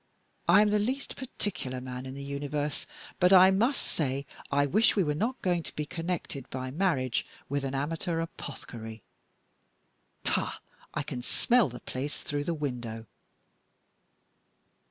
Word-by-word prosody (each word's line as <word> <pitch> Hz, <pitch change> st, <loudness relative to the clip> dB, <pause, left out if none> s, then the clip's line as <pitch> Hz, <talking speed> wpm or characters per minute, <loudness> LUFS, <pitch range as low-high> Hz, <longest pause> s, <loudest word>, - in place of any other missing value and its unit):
"I 190 Hz, +5 st, +8 dB
am 210 Hz, -, +2 dB
the 210 Hz, -, +4 dB
least 260 Hz, +6 st, -1 dB
particular 180 Hz, -, -3 dB
man 125 Hz, 0 st, -6 dB
in 130 Hz, -, -6 dB
the 140 Hz, -, -6 dB
universe, 145 Hz, +1 st, -2 dB, 0.3 s
but 180 Hz, +1 st, +6 dB
I 190 Hz, 0 st, +9 dB
must 235 Hz, +9 st, +2 dB
say 140 Hz, -2 st, -1 dB, 0.2 s
I 145 Hz, 0 st, +3 dB
wish 210 Hz, +10 st, +4 dB
we 200 Hz, -, +4 dB
were 150 Hz, -2 st, +1 dB
not 235 Hz, -, -1 dB
going 175 Hz, -2 st, +2 dB
to -, -, -9 dB
be 150 Hz, -, -1 dB
connected 165 Hz, -5 st, -3 dB
by 130 Hz, 0 st, -4 dB
marriage 140 Hz, -7 st, +1 dB, 0.3 s
with 140 Hz, 0 st, 0 dB
an 135 Hz, 0 st, -2 dB
amateur 165 Hz, +4 st, -1 dB
apothecary. 115 Hz, -8 st, -6 dB, 1.2 s
Pah! -, -, +1 dB, 0.4 s
I -, -, 0 dB
can 125 Hz, -, -4 dB
smell 235 Hz, -, +3 dB
the 125 Hz, 0 st, -8 dB
place 135 Hz, +3 st, -4 dB
through 145 Hz, 0 st, -2 dB
the 170 Hz, -, 0 dB
window." 120 Hz, -6 st, -3 dB
145 Hz, 150 wpm, -30 LUFS, 130-185 Hz, 1.2 s, I